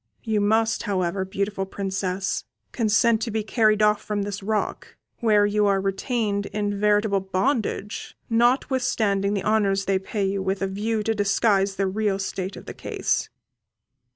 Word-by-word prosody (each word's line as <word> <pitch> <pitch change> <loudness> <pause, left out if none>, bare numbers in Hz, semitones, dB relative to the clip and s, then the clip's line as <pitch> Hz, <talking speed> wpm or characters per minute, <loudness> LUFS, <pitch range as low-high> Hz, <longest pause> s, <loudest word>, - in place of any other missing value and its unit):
You 220 -3 0
must, 220 +2 +2
however, 185 -1 0
beautiful 195 0 -2
Princess, 190 -1 -2 0.3
consent 225 0 +2
to 230 - -2
be 220 0 -1
carried 215 -1 +3
off 210 0 +3
from 205 -1 -2
this 205 0 -4
rock, 210 +1 -2 0.2
where 210 -3 +4
you 205 0 +2
are 195 -1 +3
retained 200 +1 -1
in 205 -1 -2
veritable 210 -1 +3
bondage: 205 +2 -2
notwithstanding 230 -4 +1
the 195 - -2
honours 200 -2 +2
they 195 -1 +1
pay 200 +1 -2
you 195 0 -1
with 190 +1 -1
a - - +1
view 210 +3 -2
to 225 - +1
disguise 200 -1 +2
the 195 - 0
real 200 +1 0
state 195 0 -4
of - - -11
the - - -7
case." - - -2
205 Hz, 155 wpm, -24 LUFS, 195-220 Hz, 0.3 s, where